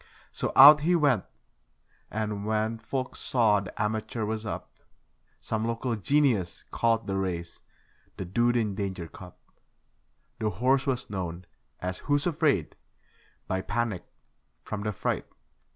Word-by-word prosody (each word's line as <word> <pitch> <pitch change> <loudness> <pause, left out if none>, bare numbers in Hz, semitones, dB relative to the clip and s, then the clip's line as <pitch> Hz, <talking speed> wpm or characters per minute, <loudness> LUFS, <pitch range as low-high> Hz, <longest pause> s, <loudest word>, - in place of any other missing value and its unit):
So - - -2
out 145 +3 +11
he 170 +4 +2
went; 140 - +3 0.8
and, 105 -1 -3
when 110 +1 -1
folk 130 +3 -4
saw 110 -5 +2
the 95 -2 -9
amateur 110 +1 -1
was 110 0 -3
up, - - -7 0.6
Some 110 0 -2
local 115 +1 -1
genius 115 - +1
called 115 -1 +1
the 95 - -2
race 85 -3 -3 0.6
'the 95 - -4
dude 120 +6 +2
in 110 -4 0
danger 95 -3 -4
cup'. 90 +1 -12 1.0
The 110 - 0
horse 130 +8 +1
was 125 -5 -2
known 90 -2 -4 0.3
as 90 0 -4
'Who's 145 0 0
Afraid', 150 - +1 0.7
by 95 0 -1
Panic 105 -2 -2 0.6
from 105 -1 -5
'The 105 +1 -1
Fright'. - - -2
110 Hz, 135 wpm, -28 LUFS, 95-125 Hz, 1.0 s, out